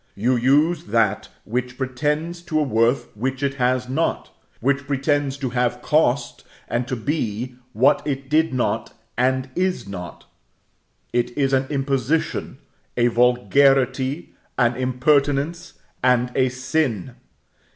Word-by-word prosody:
You 120 +6 +1
use 145 +7 +2
that 110 -1 +1
which 125 +2 -3
pretends 150 +6 -2
to 155 - +1
a - - +2
worth 115 -2 +1
which 130 +5 -3
it 140 -1 +1
has 125 0 +1
not; 145 +6 -1 0.3
which 140 +2 0
pretends 140 0 0
to 135 -3 -3
have 125 0 -1
cost, 150 -3 +1 0.2
and 120 +1 -1
to 130 - -2
be, 125 -2 -2 0.2
what 125 +6 +4
it 135 -2 -3
did 160 +3 +2
not, 120 -3 -1 0.2
and 130 +1 0
is 185 - -1
not; 90 -3 -8 0.9
it 120 0 -1
is 135 -1 +1
an 135 0 +2
imposition, 135 +1 -1 0.4
a 120 0 +4
vulgarity, 130 +4 +2 0.2
an 120 -1 +3
impertinence, 140 +5 +1 0.3
and 125 -1 +2
a 130 -1 +2
sin. 130 - -1
130 Hz, 130 wpm, -22 LUFS, 125-145 Hz, 0.9 s, what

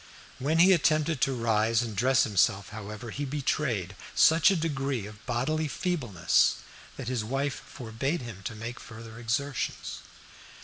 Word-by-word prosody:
When 150 +5 +1
he 185 +3 +7
attempted 155 -3 +2
to 135 - +2
rise 115 0 +2
and 110 -3 -5
dress 125 +4 +4
himself, 100 -2 +2
however, 105 +2 -7
he 145 - -4
betrayed 130 - -1 0.2
such 160 -2 +6
a 195 - +3
degree 140 - -1
of 105 0 -11
bodily 145 +6 0
feebleness 140 - +1 0.4
that - - -6
his 125 -3 -1
wife 135 +4 -2
forbade 135 +6 -3
him 110 -5 -8
to 115 - -4
make 115 +3 -6
further 115 -1 -10
exertions. 130 +3 -2
125 Hz, 145 wpm, -28 LUFS, 110-145 Hz, 0.4 s, he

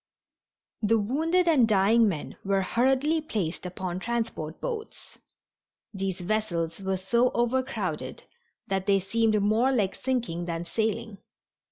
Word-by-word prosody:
The 225 +1 +3
wounded 320 - +1
and 280 -9 +5
dying 215 +2 +4
men 155 -6 -5
were 195 0 +1
hurriedly 265 - +2
placed 185 - -3
upon 180 0 -4
transport 225 -9 -3
boats. 450 -3 -6 0.7
These 190 -2 -3
vessels 175 -4 -1
were 190 -1 -1
so 235 +7 +2
overcrowded 260 +2 -1 0.4
that 195 0 -2
they 200 -1 +4
seemed 215 +3 +1
more 225 +6 +3
like 205 -7 +1
sinking 240 -10 -2
than 170 0 -3
sailing. 220 +1 -2
215 Hz, 125 wpm, -27 LUFS, 190-245 Hz, 0.7 s, and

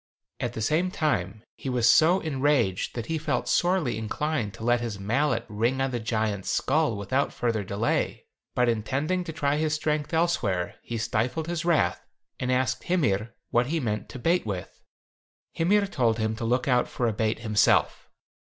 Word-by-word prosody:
At - - -2
the 110 - -3
same 165 +10 +1
time 110 - -1
he 135 - -5
was 125 -2 +2
so 170 +9 +5
enraged 135 - 0
that 120 -2 -3
he 160 +2 -2
felt 150 -1 -1
sorely 175 - +1
inclined 115 +1 -2
to - - -9
let 120 +1 +2
his 115 -4 -4
mallet 115 +4 0
ring 115 +5 0
on 135 0 0
the 120 - -2
giant's 110 -3 -1
skull 145 -5 +1
without 130 +8 0
further 115 -3 -1
delay, 100 +4 -1 0.3
but 125 0 +3
intending 135 +11 0
to 160 - -4
try 145 -2 0
his 155 0 +1
strength 150 -1 -1
elsewhere, 130 - 0
he 120 - -5
stifled 120 +7 -1
his 170 -1 -3
wrath, 170 -3 +2 0.4
and 125 0 -1
asked 130 0 0
Hymir 115 - 0 0.2
what 120 +1 +2
he 165 +3 0
meant 110 -6 -3
to - - -8
bait 170 +8 +1
with. 95 -5 -6 0.7
Hymir 200 +5 +3
told 120 - +1
him 110 -1 -1
to 115 - -3
look 125 +3 +1
out 125 -2 +3
for 120 - -1
a 115 - 0
bait 110 +1 0
himself. 110 -2 +2
125 Hz, 175 wpm, -26 LUFS, 110-155 Hz, 0.7 s, so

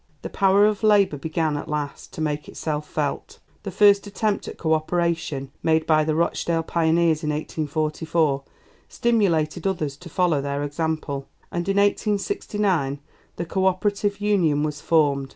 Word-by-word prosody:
The - - -6
power 195 +1 +4
of 210 -1 +1
Labour 205 -7 +4
began, 155 +1 -1
at - - -6
last, 150 -1 -4
to 170 - -6
make 150 -1 -2
itself 150 -1 -4
felt. - - -3 0.2
The - - -5
first 205 -1 +4
attempt 205 0 -1
at - - -7
co 160 -1 +1
operation 160 -4 -1
made 160 0 +2
by 155 -1 +4
the 155 0 0
Rochdale 165 0 0
Pioneers 165 -1 +2
in 150 - -1
1844 155 0 -1 0.5
stimulated 180 -8 +1
others 155 -7 -2
to 175 +2 -11
follow 170 -4 +1
their 140 +1 -2
example, 145 -2 -3 0.2
and 175 +2 -3
in 195 - +1
1869 200 - 0 0.4
the 170 - -4
Co 190 +3 0
operative 200 +2 0
Union 180 -8 +2
was 150 -1 -3
formed. 140 -4 +2
160 Hz, 150 wpm, -23 LUFS, 150-195 Hz, 0.5 s, power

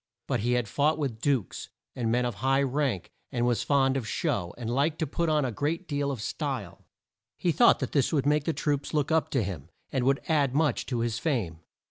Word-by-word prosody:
But - - -1
he 120 +3 +1
had 125 -3 +1
fought 150 +7 +1
with 130 -7 -3
dukes, 135 -9 -1 0.3
and 115 -3 -1
men 125 +1 +2
of 120 - -1
high 135 +1 +3
rank, 135 - -1 0.2
and 120 -3 0
was 120 -1 +1
fond 135 +1 +2
of 125 -4 -2
show, 105 - -1
and 120 -2 -5
liked 140 +6 +1
to 160 - 0
put 165 +3 -1
on 150 -2 +2
a 125 - -1
great 160 - -2
deal 145 -2 -1
of 130 -6 -4
style. - - -4 0.5
He 175 - +1
thought 160 - +5
that 130 - -2
this 140 -4 +2
would 140 -4 +1
make 150 0 +2
the - - +2
troops 145 -1 -1
look 150 +1 +1
up 160 0 +2
to 130 -5 +1
him, 90 -8 -6 0.2
and 130 - 0
would 135 +1 +2
add 140 -5 +2
much 155 0 +1
to 120 -3 -1
his 115 -1 -1
fame. 115 - -1
135 Hz, 225 wpm, -28 LUFS, 120-150 Hz, 0.5 s, thought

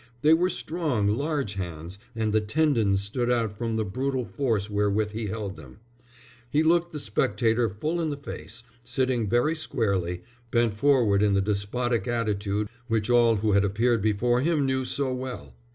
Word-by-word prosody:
They 155 +2 +6
were 175 +3 +3
strong, 155 - -1
large 140 -1 -1
hands, 90 -1 -6 0.2
and 110 -2 -1
the 110 - +3
tendons 110 -5 +1
stood 120 +4 -1
out 115 -4 0
from 115 +1 -2
the 110 -1 0
brutal 130 +5 -2
force 115 -9 -1
wherewith 105 0 0
he 110 0 -4
held 100 -2 -4
them. 70 -1 -13 0.7
He 150 +4 +2
looked 170 +1 +2
the 155 - -5
spectator 110 0 +1
full 155 - -2
in 160 - -1
the 145 - -3
face, 115 -5 -8 0.2
sitting 125 -2 0
very 120 +8 +2
squarely, 95 - -1 0.3
bent 120 -2 +2
forward 110 -4 +3
in 105 -1 +3
the - - +3
despotic 105 +3 -1
attitude 105 -3 -1 0.2
which 115 -1 0
all 120 -2 +5
who 105 +1 0
had 100 0 +4
appeared 110 +3 +1
before 115 +4 +2
him 155 -1 +1
knew 130 -1 0
so 130 0 0
well. 125 - -6
115 Hz, 170 wpm, -26 LUFS, 100-130 Hz, 0.7 s, They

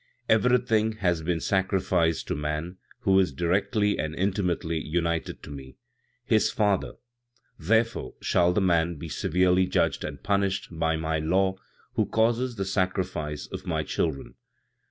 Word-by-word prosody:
"Everything 115 -1 +3
has 90 -6 0
been 85 +1 -1
sacrificed 95 -3 +1
to - - -1
man, 75 +5 -3 0.2
who 95 0 +4
is 95 -5 +2
directly 100 +7 +1
and 80 +1 -2
intimately 90 -3 -1
united 85 +1 -2
to - - -9
me, 65 -2 -10 0.5
his 110 -5 +3
Father; 105 -3 0 0.7
therefore, 115 +7 0
shall 90 0 +2
the 100 - +1
man 85 -2 +2
be 80 +2 -7
severely 90 +5 +2
judged - - +1
and - - -6
punished, 100 -1 0
by 80 -1 0
my 80 0 -1
law, 95 +5 +2 0.4
who - - +1
causes 120 +2 +1
the 95 -2 -2
sacrifice 95 -6 -2
of 95 0 -8
my 80 -3 0
children. 75 -1 -2
90 Hz, 140 wpm, -26 LUFS, 80-100 Hz, 0.7 s, who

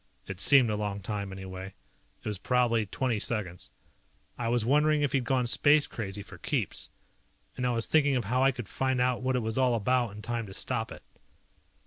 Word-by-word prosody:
It 95 -2 -7
seemed 125 +2 +5
a - - 0
long 105 -1 -2
time, 100 0 -4
anyway. 95 0 -8 0.5
It - - -7
was 105 -3 -2
probably 115 -3 +2
twenty 120 +2 -1
seconds. 90 - -3 0.7
I 120 - -3
was 120 -1 +1
wondering 150 +3 +3
if 145 - +1
he 140 - +2
had 125 - -5
gone 130 -2 +1
space 145 +4 +4
crazy 100 -2 -5
for - - -13
keeps. - - -1 0.7
And 125 -1 -1
I - - +2
was 115 -1 0
thinking 145 -3 +3
of 120 -4 0
how 125 +5 +1
I 135 - +6
could 120 -5 -7
find 130 +2 -1
out 125 0 +1
what 130 0 0
it 125 - 0
was 110 +3 -1
all 125 -2 +3
about 120 0 +1
in 105 - -9
time 115 -2 -3
to 95 - -7
stop 115 -3 -2
it. - - -10
120 Hz, 210 wpm, -29 LUFS, 105-130 Hz, 0.7 s, I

